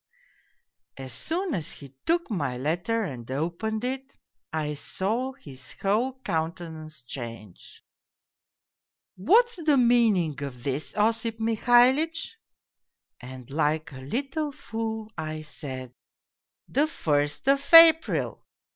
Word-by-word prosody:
" - - -50
As 130 - -8
soon 345 - -2
as 160 - -3
he 140 -2 -13
took 340 -4 +1
my 145 -10 -2
letter 175 - -1
and 125 - -6
opened 170 - -2
it, 265 +2 -4 0.3
I 155 -1 -2
saw 220 - -2
his 135 - -12
whole 240 +7 0
countenance 160 - -4
change. 115 -6 -9 0.7
"?' - - -66 0.6
What's 455 - +4
the 300 -3 +4
meaning 225 - +3
of 130 -4 -6
this, 140 +7 -3
Osip 225 +1 +1
Mihalitch? 245 +8 +3 0.4
' - - -62
"And 130 0 -10
like 155 +1 0
a 130 - -9
little 275 - -2
fool 220 -4 -5
I 155 0 -4
said 130 -4 -6 0.3
" - - -66
' - - -66
The 290 +3 +2
first 145 - -1
of 275 0 +4
April 330 -1 +7
190 Hz, 125 wpm, -26 LUFS, -, 0.7 s, April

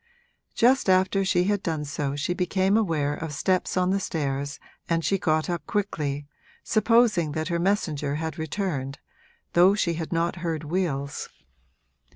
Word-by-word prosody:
Just 250 -2 +3
after 190 +1 +3
she 180 -2 +2
had 205 +1 0
done 155 -4 -2
so 145 -1 -3
she 145 +5 -1
became 190 +2 +1
aware 160 -9 +1
of 155 0 -5
steps 185 +4 0
on 180 0 +2
the 195 - +1
stairs 140 -5 -3 0.3
and 165 -1 +1
she 195 +4 +1
got 155 -1 +1
up 175 -1 -3
quickly, 150 -9 -2 0.4
supposing 215 -7 +3
that 155 +2 -2
her 170 -1 0
messenger 155 -7 0
had 160 +1 -4
returned, 155 -5 -3 0.6
though 180 +3 +6
she 180 -5 +1
had 165 -1 -5
not 170 +1 0
heard 165 -2 -3
wheels. 150 -4 -2
170 Hz, 155 wpm, -26 LUFS, 150-190 Hz, 0.6 s, though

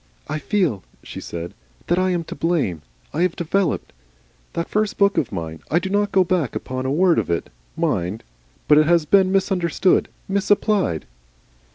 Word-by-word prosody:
"I 155 +1 -3
feel," 175 - 0 0.2
she - - -8
said, 85 0 -6 0.3
"that 175 +1 +1
I 185 0 +2
am 175 -2 0
to - - -7
blame. 155 - 0 0.3
I 155 - -1
have 180 -1 +1
Developed. 175 +1 -1 0.6
That 170 - -2
first 210 0 -1
book 200 0 +3
of 130 - 0
mine 80 -3 -5
I 160 - +2
do 190 +2 -1
not 205 0 +1
go 190 - +4
back 175 -7 -1
upon 130 0 -3
a - - 0
word 175 +3 +4
of - - -3
it, 85 -5 -2 0.3
mind, 90 +5 -1 0.4
but 150 0 +7
it 155 - +3
has 170 -2 +4
been 190 +3 +4
misunderstood, 190 -2 +2 0.2
misapplied." 200 - +1
170 Hz, 175 wpm, -22 LUFS, 135-190 Hz, 0.6 s, but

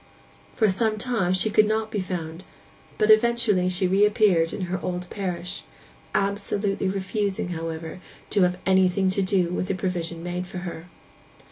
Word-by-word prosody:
For 220 - +3
some 215 +3 +1
time 215 -6 0
she 210 +3 +1
could 215 0 +5
not 220 0 -1
be 210 - -1
found; 175 -2 -5 0.5
but 215 0 +4
eventually 215 -4 +3
she 185 +1 0
reappeared 195 -3 +3
in - - -5
her 185 0 -3
old 180 0 -3
parish,—absolutely 195 - -3
refusing, 195 0 -2
however, 165 0 -5 0.3
to 205 - +2
have 180 0 +3
anything 190 0 +3
to 195 - 0
do 185 -2 +1
with 185 - -2
the 195 - -1
provision 170 -3 -3
made 180 +1 -4
for 185 - -8
her. 170 -1 -7
185 Hz, 150 wpm, -25 LUFS, 180-205 Hz, 0.5 s, could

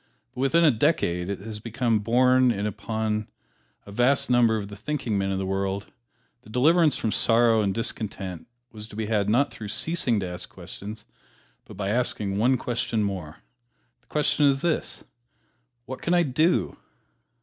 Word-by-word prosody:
But 130 - -5
within 165 +5 +4
a 155 - +6
decade 110 - 0
it 100 -1 -4
has 110 0 -7
been 115 0 0
borne 125 +4 +4
in 105 -3 -1
upon 105 +1 -2 0.6
a 100 - -11
vast 125 +5 +2
number 120 -2 +4
of 100 -2 -4
the 100 - -9
thinking 130 0 -3
men 95 -1 0
of 95 - -1
the 95 - -2
world 95 +1 -3 0.5
that - - -17
deliverance 155 +6 +4
from 110 - -1
sorrow 115 0 +4
and 100 -2 +1
discontent 95 -5 -4 0.2
was 105 -1 -8
to 105 - -12
be 110 0 -2
had 105 -2 0
not 125 +6 +2
through 105 - -8
ceasing 125 -1 0
to - - -2
ask 90 0 -7
questions, 105 +2 -9 0.6
but - - -12
by 100 -1 -2
asking 105 -4 0
one 125 +4 +3
question 115 -2 -1
more. 95 -4 -5 0.6
The - - -38
question 150 -1 +2
is 135 -1 +2
this, 170 -2 -2 0.8
"What 130 0 -7
can 175 - +1
I 175 - +4
do?" 155 +5 +1
110 Hz, 170 wpm, -25 LUFS, 100-130 Hz, 0.8 s, a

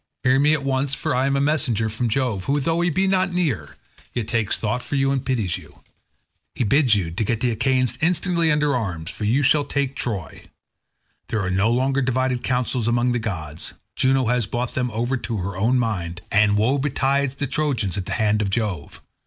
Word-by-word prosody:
Hear 130 +1 +4
me 150 +2 +4
at 140 - -4
once, 135 0 0
for - - -2
I 130 +2 +1
am 140 - +1
a - - +2
messenger 140 -7 +1
from 110 +2 -2
Jove, 110 -5 -1
who, 140 +2 +1
though 165 +4 0
he 175 - +2
be 190 +4 +1
not 190 -1 +2
near, 175 -9 -1 0.4
yet 120 -3 -2
takes 115 -4 +1
thought 110 +3 -2
for 145 - -4
you 135 0 +2
and 135 -2 -1
pities 110 -9 -1
you. - - -18 0.7
He - - 0
bids 125 +1 +4
you 90 -5 -1
get 110 +5 -1
the 125 0 +1
Achaeans 125 +1 +1
instantly 170 0 +2
under 150 -1 +2
arms, 90 -9 -3
for 105 - -5
you 125 +7 +2
shall 145 +2 +4
take 140 -1 -2
Troy. 105 - -5 0.8
There 110 - -1
are 95 - -1
no 95 +4 +2
longer 130 +3 +1
divided 130 -1 0
counsels 125 -2 0
among 120 +1 +2
the 120 - 0
gods; 80 -9 -5 0.2
Juno 130 0 +2
has 120 -2 +1
brought 120 +2 -3
them 125 -1 -1
over 120 +4 -1
to 115 -2 -4
her 95 0 -4
own 115 +7 +2
mind, 95 -8 -2
and 105 0 +4
woe 125 +7 +2
betides 140 0 +1
the 145 - -2
Trojans 135 - -1
at 95 -2 -4
the - - -2
hands 105 -1 +1
of 100 - 0
Jove. 100 -7 -3
125 Hz, 210 wpm, -22 LUFS, 110-140 Hz, 0.8 s, Hear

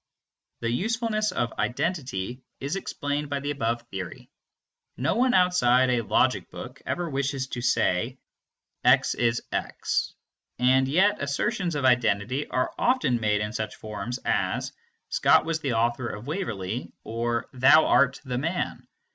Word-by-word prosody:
The 115 0 0
usefulness 215 - 0
of 120 -2 -1
identity 125 - -2 0.2
is 140 +6 -3
explained 145 -6 -3
by 140 -1 -1
the 145 +1 -3
above 120 -4 -1
theory. 95 -3 -7 0.7
No 130 - +1
one 250 +4 +3
outside 130 -9 +4
of - - +3
a 115 -3 -3
logic - - +2
book - - -9
ever 175 -1 -1
wishes 135 -2 -1
to 120 - -4
say 120 0 +1 0.7
"x - - +4
is 115 -1 0
x," - - -2 0.4
and 130 +1 +4
yet 195 +9 +3
assertions 150 +4 -1
of 140 -2 -1
identity 125 +1 +2
are 130 - -1
often 235 - +2
made 105 -2 +1
in 105 0 -3
such 110 -3 -3
forms 110 +3 -5
as - - 0 0.4
"Scott - - +4
was 165 -1 -1
the 135 -5 -1
author 120 +2 0
of 105 +1 -6
Waverley" 120 - -4
or 115 +1 -2
"thou 130 +5 +6
are 125 +1 +5
the 125 -1 -2
man." 165 +6 -3
130 Hz, 145 wpm, -26 LUFS, 115-150 Hz, 0.7 s, thou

